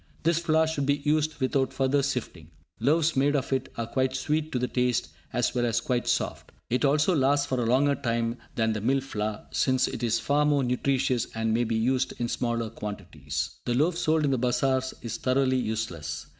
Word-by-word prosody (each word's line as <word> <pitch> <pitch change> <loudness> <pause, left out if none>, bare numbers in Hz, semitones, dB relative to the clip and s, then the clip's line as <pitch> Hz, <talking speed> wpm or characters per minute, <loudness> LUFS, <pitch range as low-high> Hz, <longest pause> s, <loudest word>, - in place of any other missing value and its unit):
_ - - -29
This 165 +1 +2
flour 160 -1 +3
should 150 -3 -2
be 145 0 +2
used 155 0 +1
without 130 0 +1
further 135 +1 +1
sifting. 125 - -4 0.3
Loaves 155 +6 +2
made 140 +2 +2
of 135 -1 -1
it 130 0 -1
are 115 - -1
quite 130 +2 0
sweet 150 +4 -1
to - - -1
the 125 0 0
taste, 125 -1 0 0.2
as - - 0
well 120 -1 0
as 115 -1 +1
quite 120 +1 -1
soft. - - -1 0.2
It 125 - +1
also 150 +5 +3
lasts 140 0 +3
for 130 -3 -1
a 115 - 0
longer 140 +4 +3
time 115 -3 -1 0.2
than 110 -1 +1
the 105 - -3
"mill 135 +5 +2
flour", 105 -5 -4
since 130 -1 +2
it - - -5
is 115 -1 +1
far 145 +4 +2
more 145 -2 +2
nutritious, 125 -1 0
and 110 0 0
may 120 +2 +2
be 115 0 -1
used 130 +3 0
in 120 -1 -1
smaller 115 -2 -1
quantities. 85 -9 -5
The 120 - 0
loaf 160 +6 +2
sold 155 -2 +1
in 140 - +1
the 130 - +1
bazars 130 +1 +1
is 115 - -4
thoroughly 130 0 +2
useless. 85 - -3
130 Hz, 210 wpm, -27 LUFS, 115-140 Hz, 0.3 s, flour